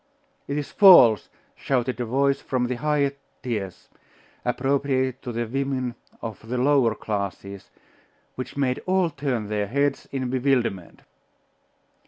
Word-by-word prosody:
'It 140 - -2
is 145 - -4
false!' 130 - +7 0.3
shouted 130 -1 -1
a 120 - -1
voice 140 +4 +1
from 125 -2 -1
the 125 - -2
highest 145 -1 0 0.3
tiers, 105 -7 -4 0.6
appropriated 130 0 0
to 125 - -5
the 120 0 -2
women 130 0 -2 0.3
of 110 -1 -7
the 125 - -1
lower 130 -3 +3
classes, 100 -2 -5 0.6
which 130 +2 -7
made 130 -2 0
all 185 -2 +2
turn 135 -7 -2
their 105 -1 -1
heads 140 +4 -1
in 130 -2 -2
bewilderment. 125 -9 -1
130 Hz, 130 wpm, -24 LUFS, 115-140 Hz, 0.6 s, false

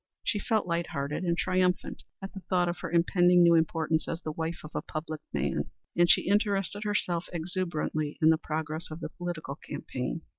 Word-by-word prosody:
She 210 - 0
felt 220 +1 +1
light 170 0 -1
hearted 140 +5 -3
and 170 -1 +1
triumphant 185 0 +1 0.2
at 195 - -6
the 195 - -6
thought 180 -2 +3
of 175 - -2
her 185 - -4
impending 175 +1 +5
new 170 0 +7
importance 160 -1 +2
as 165 - -2
the 155 - -2
wife 160 +2 -3
of 155 - -9
a - - -1
public 155 -1 -5
man, 70 -1 -1 0.3
and 175 0 +4
she - - +6
interested 205 0 +1
herself 180 -5 0
exuberantly 165 -3 -2
in 160 0 +6
the 160 - +3
progress 155 0 -3
of 155 +1 -7
the 160 - -4
political 175 -4 -5
campaign. 125 +2 -4
170 Hz, 190 wpm, -29 LUFS, 155-180 Hz, 0.3 s, new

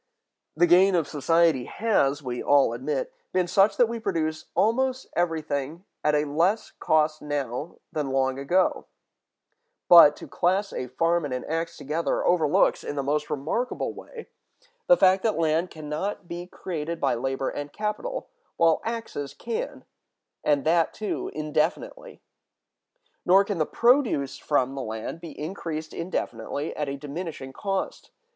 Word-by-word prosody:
The 175 - +5
gain 180 +3 +5
of 165 -4 +1
society 160 -2 +2
has, 150 -10 +1
we 125 -1 -4
all 140 -5 +4
admit, 135 +3 -3 0.2
been 185 -1 +2
such 195 +4 +3
that 245 - +6
we 230 0 -4
produce 160 -6 -2
almost 260 +4 +1
everything 160 -1 -2 0.2
at 150 0 +3
a 150 0 +2
less 170 +9 +1
cost 155 0 +2
now 145 0 -3 0.2
than 150 -3 -2
long 135 0 0
ago; 180 +7 +1 1.0
but 165 -4 +9
to - - -10
class 190 +3 0
a 125 - -4
farm 165 +7 +1
and 140 -3 -3
an 125 - -5
axe 165 +1 -3
together 155 +4 -1
overlooks, 160 -4 +3
in - - -4
the 140 - -1
most 150 +2 -1
remarkable 160 - -2
way, 465 -2 -10 0.6
the 265 - +7
fact 190 -2 +5
that 220 -3 0
land 165 +2 +1
can 155 -2 -9
not 175 +5 -3
be 175 +1 -6
created 170 -3 -5
by - - +2
labor 135 +2 -2
and 145 0 -6
capital, 215 - -3 0.3
while 165 -1 +4
axes 220 - -5
can, 465 - -5 0.6
and 145 -2 +2
that 165 0 +2
too 215 - -3
indefinitely. 155 - -2 1.0
Nor 190 +3 +6
can 200 -4 -3
the 155 - +1
produce 235 - +2
from 135 -3 +1
the 135 - -4
land 110 +7 -5
be 165 -4 -9
increased 155 -1 -5
indefinitely 145 -4 -4
at 150 -2 -2
a 140 - -4
diminishing 145 -2 -6
cost. 195 +3 -3
160 Hz, 150 wpm, -26 LUFS, 145-185 Hz, 1.0 s, but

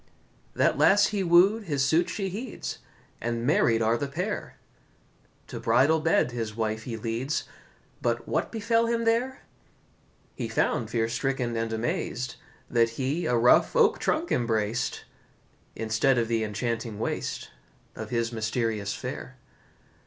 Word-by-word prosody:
That - - +2
lass 205 +1 +5
he 200 - 0
wooed, 190 +5 +4
his 140 -6 0
suit 170 +5 +2
she 195 +2 -2
heeds, 220 +5 -6 0.4
And 115 0 -2
married 115 -5 +3
are 115 +2 +2
the 140 - -2
pair; 140 - -4 0.9
To - - -7
bridal 135 +8 +3
bed 160 -5 +2
his 115 -3 -4
wife 110 -1 -2
he 115 -3 -4
leads— 115 +6 -2 0.6
But - - -1
what - - -1
befell 230 +1 +1
him 230 0 0
there? 240 +4 +1 0.9
He 120 - -4
found, 110 0 0
fear 115 -1 0
stricken 120 0 -1
and 115 0 -2
amaz'd, 120 +2 -2 0.3
That 115 -1 +3
he 140 +6 -1
a 120 - +2
rough 120 - +4
oak 460 -2 +4
trunk 325 +2 0
embrac'd, 115 -1 0 0.7
Instead 115 +4 +1
of 115 -1 +1
the 115 -1 0
enchanting 115 +1 -3
waist 110 - -3 0.4
Of 110 -1 -6
his 115 0 -1
mysterious 110 -2 -1
fair. - - -7
120 Hz, 140 wpm, -27 LUFS, 115-170 Hz, 0.9 s, lass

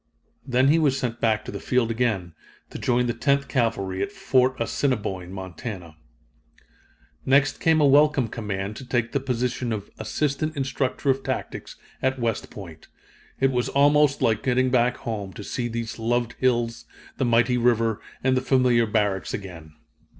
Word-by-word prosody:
Then 130 +1 +3
he 160 +3 +4
was 140 -4 +2
sent 120 -3 -3
back 110 -2 +1
to - - -6
the 100 - -6
field 125 0 +1
again, 110 -8 -1 0.4
to - - -7
join 125 0 +1
the 120 - 0
Tenth 140 +3 +1
Cavalry 115 -8 -1
at 200 - -2
Fort 130 -10 +1
Assiniboine, 105 -7 -2
Montana. 95 -2 -7 1.3
Next 135 +1 +3
came 160 -1 +3
a 150 - +5
welcome 145 -2 +4
command 105 -2 -4
to - - -8
take 120 -2 -1
the 140 - 0
position 125 -2 -2
of 105 -2 -5
Assistant 145 +7 -2
Instructor 135 0 0
of 135 +1 -2
Tactics, - - -5 0.3
at 130 0 +1
West 115 -3 -2
Point. 85 -6 -11 0.5
It 135 0 +3
was 125 -1 0
almost 145 0 +3
like 110 -2 +2
getting 130 +1 +1
back 125 -1 +2
home, 105 -4 -5
to 105 - -8
see 120 +4 -3
these 115 -1 -5
loved 120 +1 0
hills, 120 -2 0 0.3
the 130 - 0
mighty 120 +1 +3
river, 115 -2 +2 0.2
and 130 0 +3
the 130 - +1
familiar 125 -3 +3
barracks 105 -3 0
again. 85 -6 -9
120 Hz, 165 wpm, -24 LUFS, 110-130 Hz, 1.3 s, a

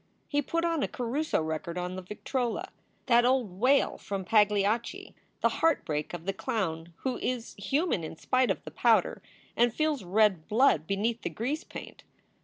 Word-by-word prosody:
He 290 -1 +1
put 335 +4 -1
a 330 -4 +1
Caruso 255 - -1
record 160 +2 -4
on 180 +1 -3
the 185 - -5
victrola, 245 - -3 0.4
that 240 -1 +5
old 245 -7 +1
wail 270 +4 +3
from 195 -2 -4
"Pagliacci," 210 +2 +2 0.3
the - - +4
heartbreak 165 - +1
of 170 -1 -9
the 195 - -1
clown 170 -5 -3
who 260 -2 -2
is 245 -2 -3
human 270 - 0
in 160 - -6
spite 255 +9 +1
of - - -1
the - - -8
powder, - - +2 0.3
and 240 0 +4
feels 305 -2 0
red 190 -3 +2
blood 215 - +3
beneath 220 +4 -1
the - - -2
grease 280 +9 -3
paint. - - -10
225 Hz, 165 wpm, -29 LUFS, 185-260 Hz, 0.4 s, that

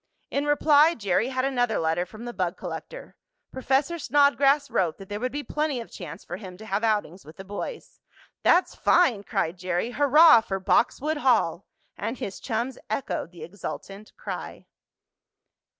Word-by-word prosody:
In 285 +1 -1
reply 295 +2 +5
Jerry 205 +2 0
had 260 0 -1
another 245 -4 0
letter 165 +2 0
from 215 +5 -10
the 240 - -6
bug 180 -4 -2
collector. - - -8 0.4
Professor 275 +6 0
Snodgrass 285 0 +3
wrote 170 -4 0
that 195 -1 -12
there 205 0 -4
would 250 +2 -2
be 290 +1 -4
plenty 300 -4 -2
of 230 - -9
chance 175 -1 -9
for 175 - -6
him 185 -3 -10
to 220 - -11
have 205 +1 -2
outings 205 -5 -1
with 155 +2 -14
the 190 - -9
boys. 205 - -7 0.4
"That's 360 +2 +3
fine!" 260 - +3
cried 175 -2 -2
Jerry. 180 +5 -2
"Hurrah 290 0 +6
for 195 -3 -4
Boxwood 290 +10 +1
Hall!" 220 - +1 0.3
And 230 +5 -3
his 195 - -6
chums 240 +2 -3
echoed 215 -7 -3
the 175 -3 -11
exultant 200 +3 -8
cry. - - -7
230 Hz, 165 wpm, -26 LUFS, 190-280 Hz, 0.4 s, Hurrah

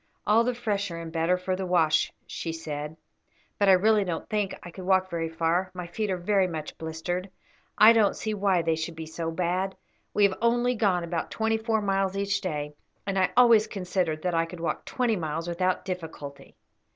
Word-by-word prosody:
"All 220 +2 +4
the 250 +1 -1
fresher 200 -7 -2
and 165 -1 -7
better 165 +2 +1
for 185 +1 -2
the 190 - -4
wash," 160 -3 +3
she 165 - -5
said; 150 -1 -5 0.6
"but 200 -1 +4
I - - +9
really 210 +3 +4
don't 175 -4 -4
think 210 -3 -1
I 175 - -9
could 185 - -9
walk 190 0 +2
very 165 -1 -2
far, 165 +3 0
my 180 -1 -5
feet 205 +5 -3
are 185 - 0
very 190 +1 +2
much 155 -3 -6
blistered. 175 +4 -4 0.5
I 215 +2 +9
don't 220 -3 +3
see 215 - -3
why 195 -4 +2
they 165 -1 +1
should 165 +1 -4
be 160 0 -6
so 165 +1 -4
bad; 180 +3 -1 0.4
we 210 - +2
have 195 -1 +4
only 240 +1 +2
gone 195 -7 +1
about 170 0 -3
twenty 225 0 0
four 220 -1 0
miles 195 -1 0
each 200 0 0
day, 150 -4 -3 0.3
and 195 -1 0
I 185 - +3
always 235 -3 +6
considered 180 -5 -2
that 180 -1 0
I 165 0 +1
could 175 0 -9
walk 165 -2 -3
twenty 240 -4 0
miles 165 0 -3
without 185 +1 0
difficulty." 160 -6 -7
185 Hz, 200 wpm, -27 LUFS, 165-200 Hz, 0.6 s, I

